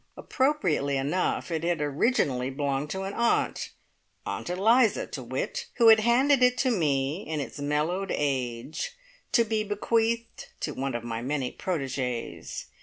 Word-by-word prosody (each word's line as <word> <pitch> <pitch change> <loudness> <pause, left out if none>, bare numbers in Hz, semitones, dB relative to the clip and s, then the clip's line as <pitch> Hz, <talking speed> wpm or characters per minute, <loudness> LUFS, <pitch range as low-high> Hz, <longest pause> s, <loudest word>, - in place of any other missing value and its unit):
Appropriately 180 - +1
enough, 150 +6 -1
it 160 -1 -1
had 170 -1 0
originally 145 - +1
belonged 140 +1 -2
to 190 +3 -3
an 195 +1 -4
aunt 235 +2 +1 0.6
Aunt - - -4
Eliza, 220 +6 +3
to - - -7
wit - - -4
who 230 -2 +6
had 220 0 +8
handed 255 +5 +4
it 250 0 +4
to 260 -1 +2
me 150 - 0
in 155 -1 -2
its 145 - -6
mellowed 155 +7 -1
age, 135 - -2 0.4
to 235 - +5
be 220 -1 -1
bequeathed 225 +3 -1
to - - -2
one 135 -1 -3
of 120 - -3
my 115 -1 -4
many 135 0 -2
protegees. 130 -8 -3
170 Hz, 150 wpm, -27 LUFS, 140-230 Hz, 0.6 s, had